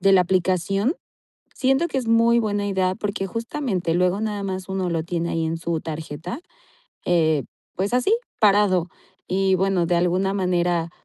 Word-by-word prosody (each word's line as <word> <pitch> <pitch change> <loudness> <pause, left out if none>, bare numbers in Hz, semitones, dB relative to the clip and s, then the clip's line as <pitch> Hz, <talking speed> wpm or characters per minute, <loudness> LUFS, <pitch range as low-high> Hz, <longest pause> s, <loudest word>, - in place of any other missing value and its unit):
de 195 +1 +4
la 190 - +7
aplicación, 190 - +1 0.6
siento 270 +6 +2
que 290 - -3
es 240 - -6
muy 230 +1 +4
buena 205 -2 -1
idea 190 -2 0
porque 200 -1 -3
justamente 230 - -2
luego 180 +2 +2
nada 210 -2 -2
más 190 -1 -4
uno 190 -1 -1
lo 165 -2 -1
tiene 170 0 -2
ahí 165 -1 -1
en 160 +1 -2
su 165 0 -2
tarjeta, 160 - -6 0.7
eh, 160 -5 +2 0.3
pues, 195 +5 -1
así 250 - +2 0.3
parado 200 -4 +4 0.4
y 190 0 +2
bueno, 185 -2 +1
de 175 - +1
alguna 180 +3 +1
manera 175 -3 0
185 Hz, 165 wpm, -23 LUFS, 175-205 Hz, 0.7 s, la